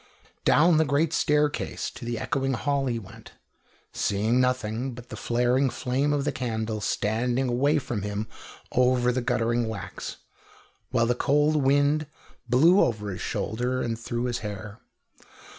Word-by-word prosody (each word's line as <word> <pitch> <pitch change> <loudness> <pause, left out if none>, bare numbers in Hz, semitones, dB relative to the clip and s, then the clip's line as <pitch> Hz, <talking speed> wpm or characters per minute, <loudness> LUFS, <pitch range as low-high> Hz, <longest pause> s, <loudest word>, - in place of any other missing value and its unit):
Down 165 +2 +5
the 160 - +5
great 145 +1 +1
staircase 150 0 0
to 120 - -9
the 120 0 -2
echoing 135 +2 -1
hall 140 +1 0
he 120 -2 -1
went, 105 -5 -11 0.6
seeing 110 +5 +1
nothing 125 0 -1
but 125 0 -11
the - - -6
flaring 125 +3 +1
flame 130 +4 -1
of 145 -1 0
the - - +1
candle 110 -3 -3
standing 120 +5 0
away 140 +5 +2
from 120 -7 -3
him 105 +2 -3 0.4
over 125 -1 +3
the 125 +1 -1
guttering 120 -1 0
wax, 110 -3 -6 0.7
while 115 - +2
the 120 - +2
cold 145 +4 +2
wind 145 +2 +2 0.4
blew 165 - +6
over 105 -3 -1
his 90 - -6
shoulder 125 +3 -2
and 115 -1 -3
through 120 +1 -3
his 125 -1 -1
hair. 105 0 -7
125 Hz, 150 wpm, -26 LUFS, 115-140 Hz, 0.7 s, blew